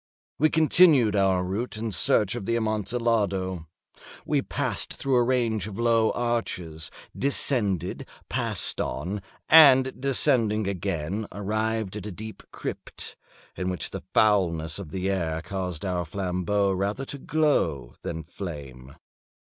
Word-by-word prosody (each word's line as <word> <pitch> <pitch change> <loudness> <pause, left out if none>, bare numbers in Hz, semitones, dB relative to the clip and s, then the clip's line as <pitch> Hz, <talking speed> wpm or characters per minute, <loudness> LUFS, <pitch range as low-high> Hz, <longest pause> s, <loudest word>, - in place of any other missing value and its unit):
We 155 +2 +4
continued 155 - +5
our 95 -2 +3
route 105 +5 -3
in 110 0 -3
search 100 +1 +2
of 120 -5 -5
the 115 - 0
Amontillado. 105 -5 -1 0.6
We - - +1
passed - - -1
through 135 -1 0
a 120 - +5
range 120 -5 +1
of 100 -2 -7
low 115 -1 +3
arches, 90 -10 -2 0.3
descended, 105 - 0 0.2
passed - - -1
on, 95 +8 -3 0.3
and 130 -5 +7
descending 120 -6 +2
again, 95 +1 -3
arrived 110 0 -2
at 105 0 -6
a - - -5
deep 110 +4 -8
crypt, - - -7 0.4
in 90 - -2
which 90 - -4
the - - -5
foulness 85 -6 +2
of 95 -6 -7
the 95 +3 -3
air 85 -5 -1
caused 90 -2 -4
our 90 -2 -1
flambeaux 95 +3 0
rather 100 +7 -2
to 140 - -6
glow 85 - 0
than 80 -1 -5
flame. 70 -9 -8
100 Hz, 130 wpm, -26 LUFS, 90-115 Hz, 0.6 s, and